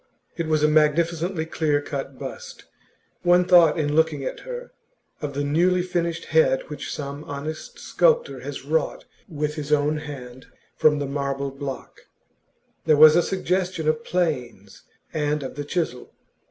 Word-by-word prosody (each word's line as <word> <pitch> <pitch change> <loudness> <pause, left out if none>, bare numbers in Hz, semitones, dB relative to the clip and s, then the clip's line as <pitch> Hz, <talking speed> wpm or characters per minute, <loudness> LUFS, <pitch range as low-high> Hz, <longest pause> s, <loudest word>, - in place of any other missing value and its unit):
It 165 -2 -3
was 155 -1 +1
a - - +6
magnificently 160 +3 +2
clear 155 -2 0
cut 140 -2 -6
bust; - - -8 0.6
one 180 0 +4
thought, 175 -4 +6
in 150 -2 0
looking 160 -3 +2
at - - -4
her, - - -8 0.5
of 145 -2 -4
the 145 - -1
newly 175 +5 +2
finished 170 -2 -2
head - - +3
which - - -6
some 140 0 -5
honest 150 +2 -6
sculptor 485 -1 +1
has - - -7
wrought 485 - -1 0.2
with 150 -2 -2
his 150 -1 -6
own 150 +1 +2
hand 130 -4 -9 0.3
from 150 -1 +4
the 145 - -2
marble 140 0 -2
block; 135 -1 -7 0.9
there 155 - +5
was 155 +1 +9
a 175 - +5
suggestion 185 -2 -1
of 155 0 +1
'planes' 125 - -2 0.3
and 150 -2 -1
of 130 - -6
the 145 - -5
chisel. 145 -5 -3
155 Hz, 155 wpm, -24 LUFS, 145-175 Hz, 0.9 s, was